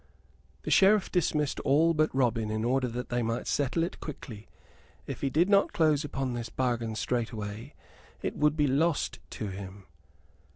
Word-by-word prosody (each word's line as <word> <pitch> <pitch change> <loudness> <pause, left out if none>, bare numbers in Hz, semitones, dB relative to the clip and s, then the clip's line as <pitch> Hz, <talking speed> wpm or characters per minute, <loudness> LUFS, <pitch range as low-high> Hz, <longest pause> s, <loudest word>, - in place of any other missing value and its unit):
The - - -3
Sheriff 200 +1 +5
dismissed 150 -5 0
all 160 +5 +3
but 155 -1 +2
Robin, 120 -4 +1
in 110 0 -2
order 130 +2 +1
that 125 +1 -5
they 120 0 0
might 115 +1 -2
settle 145 +4 0
it 170 - -4
quietly. 115 -8 -8 0.6
If - - -6
he 140 - +1
did 160 +7 +3
not 200 0 +3
close 155 -2 +3
upon 135 -3 -3
this 120 -1 -4
bargain 120 -3 -1
straightway 115 +1 -3 0.5
it - - -2
would 150 +1 +2
be 150 - +3
lost 145 +4 +1
to 110 -5 -5
him. 95 0 -8
130 Hz, 165 wpm, -29 LUFS, 115-150 Hz, 0.6 s, Sheriff